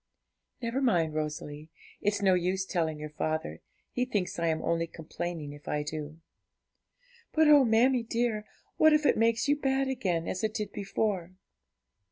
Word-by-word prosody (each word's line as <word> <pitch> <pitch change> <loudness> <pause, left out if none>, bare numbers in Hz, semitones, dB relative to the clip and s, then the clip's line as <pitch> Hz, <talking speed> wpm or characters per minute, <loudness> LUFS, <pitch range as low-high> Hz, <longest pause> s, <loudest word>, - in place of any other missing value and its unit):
'Never 235 +4 -1
mind, 170 - +2
Rosalie; 150 0 -4 0.3
it's 205 0 0
no 190 -1 +5
use 185 +1 0
telling 160 -5 -1
your 150 0 -7
father, 155 - -3 0.3
he 245 - 0
thinks 205 -9 -2
I 170 - +1
am 160 -1 0
only 165 0 0
complaining 160 -2 -6
if 145 0 -14
I 150 0 -1
do.' 155 +1 -6 1.1
'But 315 -1 +4
oh, 295 -2 +8
mammie 245 +2 +4
dear, 230 -2 -1 0.3
what 315 0 +6
if 305 0 +3
it - - +5
makes 230 +3 +2
you 290 - +4
bad 270 -1 0
again, 190 -11 -1
as 185 - -3
it 215 0 -1
did 210 -3 -3
before?' 195 -3 -2
190 Hz, 165 wpm, -29 LUFS, 160-235 Hz, 1.1 s, oh